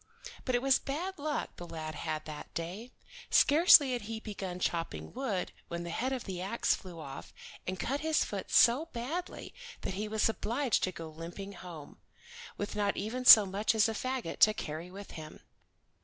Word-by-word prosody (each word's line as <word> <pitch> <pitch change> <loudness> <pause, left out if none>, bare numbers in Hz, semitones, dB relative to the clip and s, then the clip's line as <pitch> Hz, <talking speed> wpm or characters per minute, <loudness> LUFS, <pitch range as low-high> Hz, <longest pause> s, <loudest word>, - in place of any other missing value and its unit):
But 255 - +1
it 245 - 0
was 270 -1 +4
bad 335 +6 -4
luck 295 0 -3
the 175 - -8
lad 155 -1 -6
had 155 0 -4
that 155 -1 -8
day. 185 +9 -5 0.4
Scarcely 295 -3 +7
had 245 - -2
he 220 +2 -5
begun 195 -5 -6
chopping 170 -2 -3
wood 230 -8 -2 0.2
when 170 0 -4
the 170 - -5
head 255 +9 -1
of 260 -3 -3
the 185 -3 -5
ax 200 +5 +1
flew 180 -4 -8
off, 135 -3 -8 0.4
and 185 0 -3
cut 275 +4 -1
his 315 +1 +1
foot - - -5
so 255 +7 +5
badly 290 +10 -5 0.3
that - - -3
he 210 +3 -3
was 215 0 +2
obliged 230 +3 0
to 185 - -3
go 165 -2 -8
limping 170 +5 -8
home, 175 -5 -10 0.6
with 205 - -4
not 205 -1 0
even 235 +6 -3
so 215 -4 +11
much 200 +4 0
as 220 0 +4
a 225 - -2
fagot 255 -4 -3
to 215 0 +6
carry 165 -3 -5
with 200 +2 -10
him. 155 -1 -10
210 Hz, 185 wpm, -31 LUFS, 175-255 Hz, 0.6 s, so